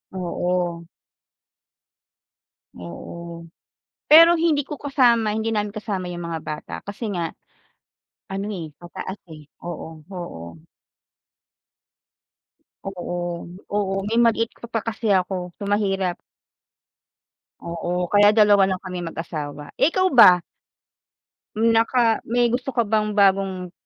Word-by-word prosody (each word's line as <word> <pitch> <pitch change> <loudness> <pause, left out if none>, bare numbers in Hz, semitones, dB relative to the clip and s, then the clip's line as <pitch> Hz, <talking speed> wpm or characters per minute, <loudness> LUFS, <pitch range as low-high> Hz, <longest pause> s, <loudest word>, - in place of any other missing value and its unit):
Oo. 175 -1 -2 1.9
Oo. 170 - -9 0.6
Pero 330 +2 +9
hindi 320 -4 +1
ko 295 - -5
kasama 245 -6 +2
hindi 220 +1 -1
namin 210 -1 -1
kasama 200 -4 -4
'yong 175 -1 -6
mga 165 -1 -4
bata 155 -1 -6
kasi 205 +3 -6
nga, 170 -2 -2 1.0
ano, 195 +1 -4
eh, 180 -6 -5 0.2
mataas, 190 +3 -7
eh. 155 -2 -12 0.2
Oo 160 -2 -7
oo. 85 - -8 2.2
Oo 175 -2 -5 0.2
oo. 200 -2 0
May 230 +2 +1
maliit 230 -1 +2
ka - - -9
pa 225 - 0
kasi 230 0 -4
ako. 180 -1 -1
So, - - -7
mahirap. 195 -3 0 1.5
Oo, 175 +1 -2
kaya 205 +1 +6
dalawa 205 -3 +6
lang 185 -1 -2
kaming 180 -2 -5
mag-asawa. 150 -3 -6
Eh, - - +6
ikaw 370 +2 +1
ba? 180 -8 +8 1.2
Naka 230 +1 +3
may 240 0 +2
gusto 250 +2 -2
ka 240 -3 +1
bang 215 0 0
bagong, 190 -2 +2
195 Hz, 115 wpm, -23 LUFS, 175-225 Hz, 2.2 s, Pero